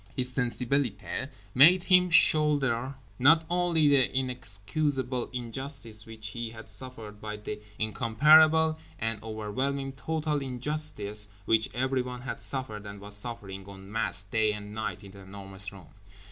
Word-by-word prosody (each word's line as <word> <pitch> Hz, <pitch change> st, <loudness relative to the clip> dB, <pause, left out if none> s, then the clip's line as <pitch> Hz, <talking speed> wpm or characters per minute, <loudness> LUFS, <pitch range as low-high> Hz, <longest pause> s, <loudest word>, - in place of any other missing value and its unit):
His 125 Hz, 0 st, 0 dB
sensibilité 125 Hz, -1 st, -1 dB, 0.2 s
made 170 Hz, +8 st, +7 dB
him 180 Hz, -1 st, +4 dB
shoulder 140 Hz, -6 st, +3 dB, 0.2 s
not 160 Hz, +5 st, +5 dB
only 175 Hz, -3 st, +2 dB
the 140 Hz, -3 st, +4 dB
inexcusable 130 Hz, +2 st, -2 dB
injustice 120 Hz, -2 st, -6 dB
which 110 Hz, -1 st, -9 dB
he 115 Hz, +1 st, -5 dB
had 110 Hz, -1 st, -11 dB
suffered 105 Hz, -2 st, -9 dB
but 105 Hz, -1 st, -7 dB
the 105 Hz, 0 st, -5 dB, 0.2 s
incomparable 155 Hz, +9 st, +4 dB, 0.2 s
and 110 Hz, -1 st, -3 dB
overwhelming 130 Hz, +6 st, -3 dB
total 150 Hz, +2 st, -2 dB
injustice 125 Hz, -6 st, 0 dB, 0.2 s
which 110 Hz, 0 st, +2 dB
everyone 125 Hz, -1 st, -1 dB
had 125 Hz, -, -4 dB
suffered 110 Hz, -6 st, -1 dB
and 100 Hz, 0 st, -9 dB
was 100 Hz, +1 st, +4 dB
suffering 105 Hz, -4 st, -4 dB
en 95 Hz, 0 st, -12 dB
masse 115 Hz, -2 st, 0 dB
day 110 Hz, +1 st, +1 dB
and 105 Hz, 0 st, -8 dB
night 110 Hz, -1 st, -4 dB
in 100 Hz, -, -11 dB
The 100 Hz, -, -14 dB
Enormous 95 Hz, 0 st, -6 dB
Room. 95 Hz, -5 st, -13 dB
120 Hz, 135 wpm, -28 LUFS, 105-140 Hz, 0.2 s, made